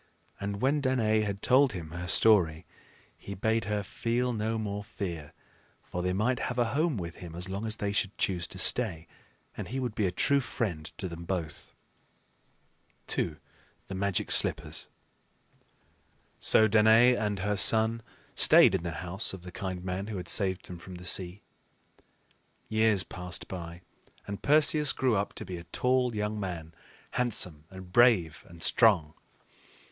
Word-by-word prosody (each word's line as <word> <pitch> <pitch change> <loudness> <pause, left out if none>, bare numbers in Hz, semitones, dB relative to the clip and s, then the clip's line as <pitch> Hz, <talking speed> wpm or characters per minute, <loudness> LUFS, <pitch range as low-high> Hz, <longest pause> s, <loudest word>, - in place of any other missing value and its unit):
And 100 +2 -4
when 145 +2 +2
Danaë 110 -5 +1
had 100 -1 -5
told 130 -1 +4
him 80 -4 -7
her 85 +1 -6
story, 90 -3 +4 0.5
he 100 - -9
bade 110 +2 0
her 105 -1 -2
feel 120 +5 -2
no 110 0 -2
more 105 -2 -4
fear; 85 -8 -6 0.5
for 90 - -6
they 90 +1 -1
might 110 +7 0
have 125 - -4
a 120 -1 0
home 155 -2 0
with 85 -3 -6
him 85 -2 -10
as 90 +2 -4
long 100 +4 -4
as 110 - -1
they 100 -1 -2
should 100 -1 -2
choose 90 -4 -1
to - - -8
stay, 95 -10 +3 0.5
and - - -6
he 130 - -4
would 125 -4 -3
be 105 -2 0
a - - -2
true 140 +10 +2
friend 100 - -4
to 95 - -2
them 85 -1 -8
both. 85 -4 -5 1.4
II. 80 - -1 0.5
THE - - -5
MAGIC 95 -1 -1
SLIPPERS. - - +2 1.5
So 110 - +5
Danaë 110 +3 +5
and 105 -3 -2
her 105 +2 -1
son 110 +3 +3 0.3
stayed - - +7
in 95 - 0
the 85 -1 -5
house 95 +5 -3
of 95 -2 -9
the 90 - -9
kind 95 -2 -5
man 95 +2 -4
who 110 -2 -5
had 90 -1 -7
saved 95 -1 +1
them 90 -2 -9
from 90 +1 -11
the 90 0 -11
sea. 90 +2 +1 1.2
Years 110 -3 +2
passed 90 -3 -6
by, 85 -1 -8 0.4
and 100 -1 -7
Perseus 150 0 +4
grew 130 -3 +1
up 100 0 -2
to - - -8
be 90 - -6
a 85 - -10
tall 125 +5 0
young 105 0 -2
man, 85 -5 -6 0.4
handsome, 90 -11 -1
and 95 -1 -12
brave, 110 -10 +3
and 85 -1 -8
strong. 90 -10 +3
100 Hz, 165 wpm, -29 LUFS, 90-110 Hz, 1.5 s, stayed